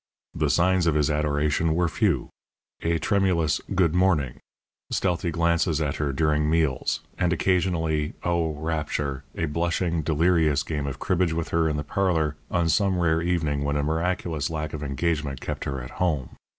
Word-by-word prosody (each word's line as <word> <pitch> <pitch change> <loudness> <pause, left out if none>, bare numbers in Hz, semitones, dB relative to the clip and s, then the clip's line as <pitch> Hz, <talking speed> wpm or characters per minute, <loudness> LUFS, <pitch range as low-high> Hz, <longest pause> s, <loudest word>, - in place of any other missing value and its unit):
The - - 0
signs 90 0 +3
of 80 - +2
his 75 0 +2
adoration 75 +2 +1
were 85 0 +2
few 85 - 0 0.5
a 85 0 +1
tremulous 85 -5 +1
"Good 90 -4 +3
morning," 80 -9 +2 0.5
stealthy 90 -2 0
glances 85 -1 +1
at 75 -3 -1
her 75 -2 -1
during 75 +1 +1
meals, 80 -5 +1 0.2
and 90 - +2
occasionally 85 -4 +1
(Oh, 85 -2 0
rapture!) 75 -3 -2
a 85 - 0
blushing, 85 +2 0
delirious 80 -1 +2
game 75 -2 -3
of 70 - -4
cribbage 90 -2 +1
with 80 0 -2
her 80 -1 +2
in 75 - -1
the 75 - -2
parlour 80 -3 0
on 85 -1 +1
some 95 +3 +2
rare 80 -2 +2
evening 80 -5 0
when 70 0 -1
a 70 - 0
miraculous 80 0 -1
lack 75 -1 -4
of 75 - -5
engagement 75 -1 -1
kept - - -5
her 70 -1 -3
at 60 - -9
home. 75 -9 -1
80 Hz, 165 wpm, -25 LUFS, 75-85 Hz, 0.5 s, signs